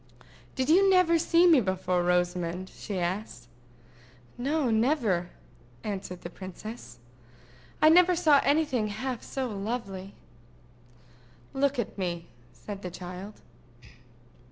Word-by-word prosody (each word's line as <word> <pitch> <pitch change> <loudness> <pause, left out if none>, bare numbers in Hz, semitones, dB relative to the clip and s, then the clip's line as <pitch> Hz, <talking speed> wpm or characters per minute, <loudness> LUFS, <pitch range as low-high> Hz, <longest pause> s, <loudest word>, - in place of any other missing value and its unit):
"Did 260 -1 -1
you 385 +5 +5
never 365 -3 +4
see 335 +2 +4
me 325 -7 +6
before, 185 -2 0
Rosamond?" 180 +1 0
she 200 - -6
asked. 185 +5 -3 0.9
"No, 275 0 0
never," 220 - +1 0.5
answered 190 -3 -5
the 175 - -7
princess. 185 - -9 0.9
"I 310 - +8
never 360 +2 +6
saw 310 -5 +5
any 310 +3 +3
thing 245 -7 -1
half 235 +4 -4
so 265 -1 -4
lovely." 200 -3 -5 1.4
"Look 280 0 +1
at 225 -3 -3
me," 170 -2 -3 0.2
said 190 - -9
the 180 - -5
child. 180 +3 -9
215 Hz, 115 wpm, -28 LUFS, 180-280 Hz, 1.4 s, I